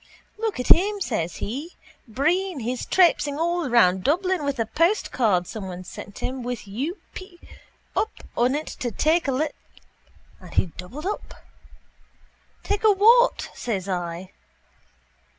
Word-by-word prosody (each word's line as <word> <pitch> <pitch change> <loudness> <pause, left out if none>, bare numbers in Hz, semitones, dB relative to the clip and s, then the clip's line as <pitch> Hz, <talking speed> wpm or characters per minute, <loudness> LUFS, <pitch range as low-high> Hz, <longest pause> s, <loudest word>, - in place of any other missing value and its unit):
—Look 445 - -2
at 250 - -3
him, 405 +4 +5
says 195 - -2
he. 285 - -5 0.3
Breen. 320 - 0
He's 245 +2 -3
traipsing 300 -6 +3
all 340 -2 0
round 190 -6 +4
Dublin 365 +2 +1
with 280 -1 -1
a 230 - 0
postcard 235 - +1
someone 185 -3 -6
sent 200 +2 -10
him 260 0 -3
with 245 -3 -5
U. 275 - -3 0.2
p: 375 -2 -10 0.6
up 440 - +1 0.3
on 250 +3 +2
it 305 +1 -2 0.2
to 245 - 0
take 315 - +1
a - - +2
li... 295 +4 0 0.9
And - - -12
he - - +4
doubled 250 - -8
up. 410 +2 -5 1.2
—Take 410 +1 -1
a 435 - +7
what? 465 +5 +4
says 200 -6 -3
I. 175 0 -4
280 Hz, 140 wpm, -24 LUFS, 215-360 Hz, 1.2 s, a